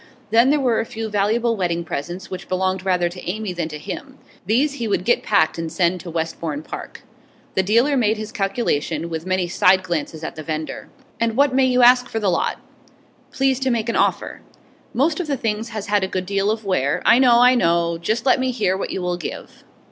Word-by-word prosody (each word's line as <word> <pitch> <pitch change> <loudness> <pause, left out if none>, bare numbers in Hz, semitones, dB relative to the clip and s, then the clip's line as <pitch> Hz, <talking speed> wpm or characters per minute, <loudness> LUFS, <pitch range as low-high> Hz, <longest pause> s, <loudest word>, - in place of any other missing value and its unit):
Then 230 +3 +5
there 295 +1 +3
were 245 -4 +1
a - - +1
few 225 -2 -5
valuable 220 +3 +1
wedding 170 -4 -1
presents, 175 +4 -6
which 185 0 -7
belonged 185 0 -1
rather 180 -2 +1
to 175 0 -7
Amy 210 0 -3
than 170 -2 -3
to 150 - -6
him; 270 - -8 0.3
these 265 +7 +2
he 235 -5 -4
would 200 -3 -1
get 240 - +3
packed 165 -5 +1
and 165 -1 -4
send 175 +2 +1
to 175 - -9
Westbourne 160 -2 -3
Park. - - -9 0.5
The 190 - +2
dealer 230 +9 +2
made 225 -4 +2
his 215 0 -6
calculation, 195 - -2
with 160 +2 -5
many 185 -1 0
side 185 +1 +3
glances 160 -2 -4
at - - -5
the 155 - -7
vendor. 155 0 -5 0.3
'And 230 0 0
what 280 -1 +4
may 265 0 +4
you 250 -1 +3
ask 250 +1 +6
for 225 - -2
the 200 -3 +1
lot?' 170 - 0 0.7
'Please 270 -1 +1
to 265 -1 0
make 235 -2 -1
an - - -1
offer.' - - 0 0.5
'Most 305 +7 +1
of 355 - -3
the 280 -2 -1
things 225 0 -2
has 215 -3 -5
had 205 -1 +1
a - - 0
good 185 -1 -3
deal 200 +1 0
of 220 0 -2
wear 145 -8 0
' - - -26
'I 235 - +6
know, 245 -2 +5
I 250 +1 +6
know. 170 -6 +1
Just 220 +8 -1
let 260 - +4
me 260 0 0
hear 215 -7 0
what 195 - -4
you 185 - -4
will 180 0 -1
give. 170 - -8
200 Hz, 225 wpm, -21 LUFS, 175-235 Hz, 0.7 s, ask